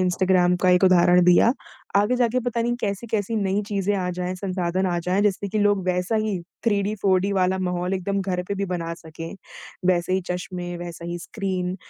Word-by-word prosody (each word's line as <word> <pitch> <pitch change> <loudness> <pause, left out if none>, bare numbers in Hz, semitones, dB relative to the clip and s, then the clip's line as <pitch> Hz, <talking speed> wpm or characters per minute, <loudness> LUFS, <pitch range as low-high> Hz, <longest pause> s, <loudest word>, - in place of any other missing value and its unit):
Instagram 180 0 +3
का 185 - +5
एक 180 +1 +4
उदाहरण 180 -1 +5
दिया। 180 +6 +5 0.4
आगे 210 +5 +3
जाके 245 0 +1
पता 235 -1 0
नहीं 240 +1 0
कैसी-कैसी 210 +1 -2
नई 200 0 0
चीज़ें 205 -1 0
आ 185 -2 -1
जाएँ, 180 0 -2
संसाधन 185 -1 -1
आ 175 -1 0
जाएँ, 180 +4 0
जिससे 200 -1 0
कि 215 - -2
लोग 205 -2 +2
वैसा 180 +4 0
ही 205 -4 -1 0.3
थ्रीडी, 205 -2 +1
फोरडी 195 0 +2
वाला 190 -1 +1
माहौल 180 0 -1
एकदम 195 +1 -1
घर 185 -2 -2
पे 200 - -1
भी 200 0 -2
बना 170 -2 -3
सकें। 165 +1 -9 0.6
वैसे 175 +1 -1
ही 190 - +2
चश्मे, 180 0 -4
वैसा 170 -1 -7
ही 175 0 -4
स्क्रीन, 185 -1 -3
185 Hz, 190 wpm, -23 LUFS, 180-200 Hz, 0.6 s, का